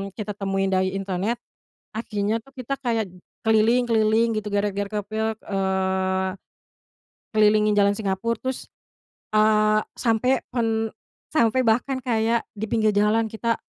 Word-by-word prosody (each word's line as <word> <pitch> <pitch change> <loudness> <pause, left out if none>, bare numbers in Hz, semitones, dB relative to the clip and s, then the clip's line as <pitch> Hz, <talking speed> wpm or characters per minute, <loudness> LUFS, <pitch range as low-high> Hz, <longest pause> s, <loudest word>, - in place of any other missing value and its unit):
kita 210 -2 -4
temuin 195 -1 -1
dari 190 0 +1
internet, 195 +3 -1 0.6
akhirnya 215 -1 -1
tuh 270 - -20
kita 255 +2 -3
kayak 230 -5 -1 0.4
keliling-keliling 225 0 +3
gitu 210 -1 -3
gara-gara 200 0 0
kepil 220 +2 -2
eee, 190 -1 0 1.1
kelilingin 210 0 +4
jalan 200 -1 +4
Singapura 205 +2 -2
terus 260 0 -5 0.6
eee, 215 0 +4 0.2
sampai 250 +3 +2 0.2
pen 225 -2 0 0.4
sampai 235 -2 +3
bahkan 245 +4 +2
kayak 230 -2 0
di 215 +1 -4
pinggir 215 -2 +3
jalan 210 +2 +3
kita, 225 +1 -1
215 Hz, 120 wpm, -24 LUFS, 200-230 Hz, 1.1 s, kelilingin